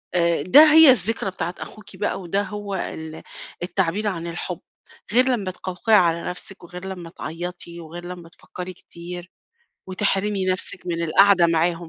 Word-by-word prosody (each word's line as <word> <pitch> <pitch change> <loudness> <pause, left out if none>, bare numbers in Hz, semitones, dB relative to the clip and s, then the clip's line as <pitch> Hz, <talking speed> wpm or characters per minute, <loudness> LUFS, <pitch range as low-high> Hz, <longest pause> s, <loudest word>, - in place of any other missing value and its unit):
آآ 170 -3 +2
ده 300 - +8
هي 320 -4 +9
الذكرى 225 -2 +1
بتاعة 175 -1 -4
أخوكِ 215 -2 -10
بقى 205 -1 -2
وده 195 +3 -1
هو 205 -1 -5
ال 160 -3 -6 0.4
التعبير 190 +3 -1
عن 170 -4 -3
الحب، 175 0 -5 0.5
غير 250 +2 +5
لمّا 205 -7 -1
تقوقعي 185 +4 0
على 170 -3 +3
نفسِك 180 +1 -6
وغير 180 +2 -9
لمّا 180 -3 -7
تعيّطي 170 +1 -7
وغير 170 +2 -9
لمّا 175 -2 -9
تفكّري 180 +2 -9
كتير، 175 +1 -10 0.6
وتحرمي 195 +1 0
نفسِك 185 0 -2
من 170 -1 -2
القعدة 185 +1 +5
معاهم، 165 0 0
180 Hz, 150 wpm, -22 LUFS, 170-200 Hz, 0.6 s, هي